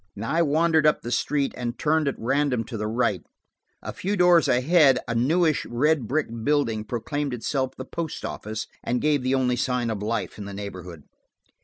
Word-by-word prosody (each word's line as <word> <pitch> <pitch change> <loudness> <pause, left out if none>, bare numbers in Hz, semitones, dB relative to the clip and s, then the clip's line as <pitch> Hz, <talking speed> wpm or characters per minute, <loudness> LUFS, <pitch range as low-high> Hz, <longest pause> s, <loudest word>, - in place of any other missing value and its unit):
I 135 +10 0
wandered 160 0 +3
up 150 - +2
the 120 - -5
street 140 +3 0
and 120 -1 -4
turned 155 0 +1
at 140 - 0
random 135 0 0
to 115 +2 -8
the 105 -1 -2
right; 110 -5 0 0.6
a - - -5
few 200 +3 -2
doors 175 -2 +5
ahead 135 +2 +4
a 115 - -1
newish 155 +6 +2
red 135 +1 +1
brick 150 +5 0 0.2
building 115 -6 +1
proclaimed 135 +4 -3
itself 130 +2 -2
the 130 - -6
post 165 +2 -5
office, 110 0 -5 0.2
and 120 +1 0
gave 150 -1 +1
the 130 +1 +1
only 125 -2 +1
sign 125 -2 0
of 105 -2 -4
life 110 0 -3
in 100 - -6
the 100 0 -7
neighborhood. 90 -6 -8
130 Hz, 185 wpm, -25 LUFS, 115-150 Hz, 0.6 s, doors